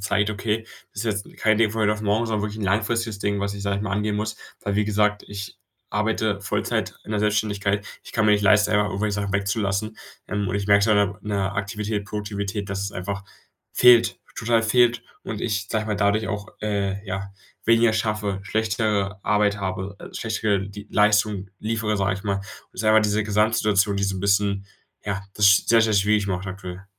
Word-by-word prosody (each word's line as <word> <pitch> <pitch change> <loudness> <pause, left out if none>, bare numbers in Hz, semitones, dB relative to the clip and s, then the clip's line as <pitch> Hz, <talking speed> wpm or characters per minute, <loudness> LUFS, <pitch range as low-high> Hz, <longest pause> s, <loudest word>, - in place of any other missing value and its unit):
zeigt: 100 +1 +1
„Okay, 110 +2 -2 0.3
das 105 +3 -4
ist 105 -3 -1
jetzt - - -17
kein 110 -1 +3
Ding 115 -1 +3
von 110 +1 -3
heute 105 0 +3
auf 105 0 -5
morgen, 105 +3 +1
sondern 110 -2 -1
wirklich 105 +1 -4
'n 100 - -2
langfristiges 110 +2 0
Ding, 100 -1 0
was 100 0 -2
ich, 100 - -7
sage 100 -1 0
ich 100 - -3
mal, 95 -2 -3
angehen 105 +1 0
muss”, 110 +1 -2 0.3
weil, 100 -1 -1
wie 105 - +2
gesagt, 105 0 +1
ich 100 -1 -7 0.3
arbeite 105 0 0
Vollzeit 100 - -2
in 110 - -6
der 105 - 0
Selbstständigkeit. 105 -1 0 0.2
Ich - - -12
kann 105 0 +2
mir 105 - +6
nicht 105 0 +2
leisten, 105 +1 +4
einfach 105 0 +3
irgendwelche 100 +2 -1
Sachen 100 -1 -2
wegzulassen, 100 +1 -1 0.3
ähm, 105 -2 -1
und 95 - -1
ich 100 - -3
merke 100 0 +5
so 110 - +2
an 105 - +5
der 100 0 +4 0.2
an 105 - -8
der 100 -1 -1
Aktivität, 105 +1 -3
Produktivität, 100 -1 -4
dass 100 0 -3
es 100 - -4
einfach 100 +1 -4 0.5
fehlt, 120 -2 +6 0.2
total 115 -1 +2
fehlt 120 0 +3 0.2
und 105 - -5
ich, 100 -3 -2
sage 110 -1 0
ich - - -8
mal, 105 - -1
dadurch 105 +2 +2
auch, 105 0 -4
äh, 100 -1 -2
ja, 95 +1 -4 0.3
weniger 115 0 +4
schaffe, 105 -3 -1
schlechtere 105 -2 -1
Arbeit 105 0 +2
habe, 95 +1 -4
äh, - - -10
schlechtere 105 -3 -1
die 100 0 -10
Leistung 105 -2 +2
liefere, 110 -1 -1
sage 100 0 +1
ich 100 - -9
mal. 100 -1 0 0.3
Ist 100 - -5
einfach 110 0 +6
diese 105 0 +1
Gesamtsituation, 105 -1 +2
die 100 - -1
so 95 -1 0
'n 95 - -5
bisschen, 100 0 +1 0.4
ja, 100 -1 -2
das 100 -1 +6
sehr, 115 0 +5
sehr 110 -1 +2
schwierig 105 0 +3
macht, 95 0 -2
aktuell. 95 0 -7
105 Hz, 210 wpm, -24 LUFS, 100-110 Hz, 0.5 s, mir